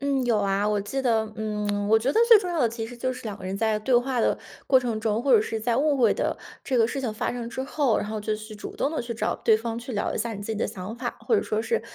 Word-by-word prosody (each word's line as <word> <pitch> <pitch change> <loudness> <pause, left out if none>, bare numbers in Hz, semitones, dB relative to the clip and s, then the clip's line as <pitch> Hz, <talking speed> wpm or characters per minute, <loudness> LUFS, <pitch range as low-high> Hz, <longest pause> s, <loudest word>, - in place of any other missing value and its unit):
嗯， 275 -2 0
有 235 -3 +2
啊。 200 0 +1
我 210 -1 +1
记 235 +7 -3
得， 230 -4 +2
嗯， 210 -1 -2
我 220 - +6
觉 250 +6 +1
得 - - +2
最 460 - +10
重 365 -3 -4
要 345 - -1
的 240 - +4
其 225 0 -5
实 240 +2 -9
就 255 +1 -1
是 - - -9
两 210 -3 -5
个 185 - -10
人 190 +1 -3
在 220 0 +1
对 245 +4 0
话 250 0 +1
的 - - +2 0.3
过 260 - +6
程 235 -4 -2
中， 220 0 0
或 270 0 +3
者 225 - +7
是 220 +1 -3
在 230 +1 0
误 285 +1 +2
会 250 - +4
的 - - -1 0.3
这 260 - 0
个 230 -2 +5
事 270 +4 -3
情 235 -5 -2
发 - - -2
生 240 -1 -5
之 260 +2 -4
后， 270 -4 +1
然 - - -1
后 215 0 -4
就 215 +1 -1
去 215 0 -9
主 210 - -8
动 280 - 0
地 320 - -2
去 235 -1 -5
找 225 - -1
对 220 - +6
方 230 +1 -4
去 245 +2 -7
聊 205 - -1
一 - - -3
下 230 +1 -2
你 200 - -7
自 - - -7
己 - - -3
的 - - +1
想 190 +4 -6
法， 240 0 -4
或 455 - +2
者 - - +3
说 215 +1 -1
是 465 - 0
230 Hz, 340 characters per minute, -25 LUFS, 215-255 Hz, 0.3 s, 最